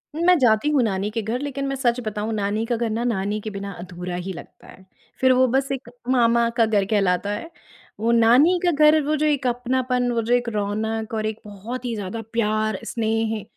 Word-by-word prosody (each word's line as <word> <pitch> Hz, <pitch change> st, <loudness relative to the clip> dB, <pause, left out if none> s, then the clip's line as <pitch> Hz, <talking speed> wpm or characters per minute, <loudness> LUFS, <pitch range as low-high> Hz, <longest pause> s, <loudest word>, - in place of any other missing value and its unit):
मैं 345 Hz, +2 st, +4 dB
जाती 240 Hz, +2 st, +3 dB
हूँ 290 Hz, -4 st, +3 dB
नानी 200 Hz, -2 st, -1 dB
के 225 Hz, -, -2 dB
घर, 225 Hz, +4 st, -3 dB
लेकिन 275 Hz, -1 st, -3 dB
मैं 275 Hz, -, -2 dB
सच 250 Hz, -2 st, 0 dB
बताऊँ, 215 Hz, +1 st, -3 dB
नानी 210 Hz, +1 st, -1 dB
का 240 Hz, +1 st, -1 dB
घर 230 Hz, 0 st, -1 dB
ना, 225 Hz, +2 st, -2 dB
नानी 210 Hz, -3 st, -1 dB
के 215 Hz, -, -5 dB
बिना 200 Hz, 0 st, -6 dB
अधूरा 180 Hz, 0 st, -6 dB
ही 180 Hz, +2 st, -4 dB
लगता 170 Hz, -, -13 dB
है, 185 Hz, -, -15 dB, 0.4 s
फिर 260 Hz, 0 st, +5 dB
वो 255 Hz, 0 st, +4 dB
बस 265 Hz, +2 st, 0 dB
एक 265 Hz, -2 st, -5 dB, 0.2 s
मामा 235 Hz, -2 st, +3 dB
का 230 Hz, -, +5 dB
घर 210 Hz, -3 st, +1 dB
कहलाता 195 Hz, -2 st, +1 dB
है। 230 Hz, +11 st, -5 dB, 0.5 s
वो 230 Hz, +2 st, +1 dB
नानी 245 Hz, +10 st, +5 dB
का 350 Hz, -, +4 dB
घर, 305 Hz, 0 st, +5 dB
वो 300 Hz, +2 st, 0 dB
जो 305 Hz, 0 st, 0 dB
एक 285 Hz, -3 st, +1 dB
अपनापन, 250 Hz, 0 st, 0 dB
वो 235 Hz, -, 0 dB
जो 230 Hz, +2 st, 0 dB
एक 245 Hz, -1 st, +1 dB
रौनक 215 Hz, +1 st, -2 dB
और 215 Hz, -1 st, -1 dB
एक 215 Hz, 0 st, -3 dB
बहुत 220 Hz, +5 st, -7 dB
ही 235 Hz, -, -2 dB
ज़्यादा 205 Hz, +2 st, -5 dB
प्यार, 215 Hz, -2 st, 0 dB
स्नेह, 225 Hz, -2 st, -1 dB
230 Hz, 215 wpm, -23 LUFS, 210-255 Hz, 0.5 s, फिर